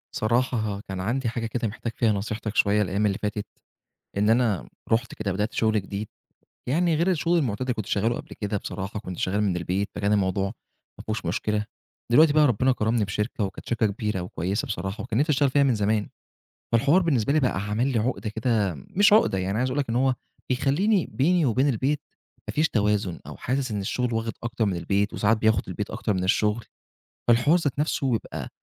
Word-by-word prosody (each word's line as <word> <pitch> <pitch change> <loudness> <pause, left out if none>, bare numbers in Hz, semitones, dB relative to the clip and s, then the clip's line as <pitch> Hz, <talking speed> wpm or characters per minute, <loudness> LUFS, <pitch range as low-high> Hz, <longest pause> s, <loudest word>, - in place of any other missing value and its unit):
صراحة 110 -3 0
كان 95 -1 -5
عندي 120 +5 -1
حاجة 115 0 -3
كده، 115 0 -2
محتاج 115 +2 -5
فيها 115 -2 +2
نصيحتك 105 +1 -3
شوية، 105 +1 +3
الأيام 100 +2 0
اللي 100 -2 +1
فاتت، 105 0 -3 0.7
إن 105 +1 +3
أنا 110 - +2 0.2
رُحت 115 +1 +1
كده 105 -2 -2
بدأت 105 +4 -1
شغل 110 -2 +2
جديد، 100 +2 -5 0.6
يعني 165 +4 +2
غير 170 +4 +2
الشغل 170 +1 +1
المعتاد 120 -10 -1
اللي 130 -1 0
كنت 110 -3 -4
شغاله 110 +5 +1
قبل - - -8
كده، 105 0 -1
بصراحة 100 +2 -5
كنت 95 -4 -7
شغال 100 +3 0
من 95 -4 +1
البيت، 90 +4 -1
فكان 100 +1 +1
الموضوع 95 -1 +1 0.5
ما - - -8
فيهوش 110 -3 -3
مشكلة. 105 +5 -1 0.5
دلوقتي 150 +4 +6
بقى، 155 0 +5
ربنا 130 +2 +2
كرمني 110 -2 +1
بشركة، 105 +3 -2
وكانت 95 - -5
شركة 115 -2 +2
كبيرة 105 -1 -2
وكويسة 90 +4 -2
بصراحة، 95 +1 -4
وكان 115 - -1
نفسي 155 +2 +2
أشتغل 140 -1 +3
فيها 140 +2 +3
من 130 -4 +3
زمان، 105 0 0 0.6
فالحوار 140 +10 +4
بالنسبة 140 - +1
لي 155 - +4
بقى 125 -8 0
عامل 105 +5 0
لي 120 - +1
عقدة 115 -1 -1
كده، 110 -3 0
مش 200 +1 +3
عقدة 215 - +4
يعني، 95 +1 -1
أنا 105 - -1
عايز 130 +1 +1
أقول 130 +3 -1
لك 135 - -2
إن 115 - -1
هو 130 +1 +2 0.3
بيخليني 165 - +2
بيني 170 +4 +2
وبين 130 +3 +2
البيت 140 +4 0 0.5
ما - - -4
فيش 155 +2 +2
توازن، 105 -4 0
أو - - -8
حاسس 130 -1 -2
إن 105 -1 -2
الشغل 125 +5 -1
واخد 115 0 -1
أكتر 120 -1 -1
من 100 -3 0
البيت، 100 +4 0
وساعات 110 +2 +2
بياخد 110 -2 +2
البيت - - -4
أكتر 105 - -1
من 90 -1 -1
الشغل. 105 +4 +1 0.6
فالحوار 120 +9 +5
ذات 145 -5 -2
نفسه 140 -4 +1
يبقى 110 - -4
110 Hz, 200 wpm, -25 LUFS, 100-130 Hz, 0.7 s, دلوقتي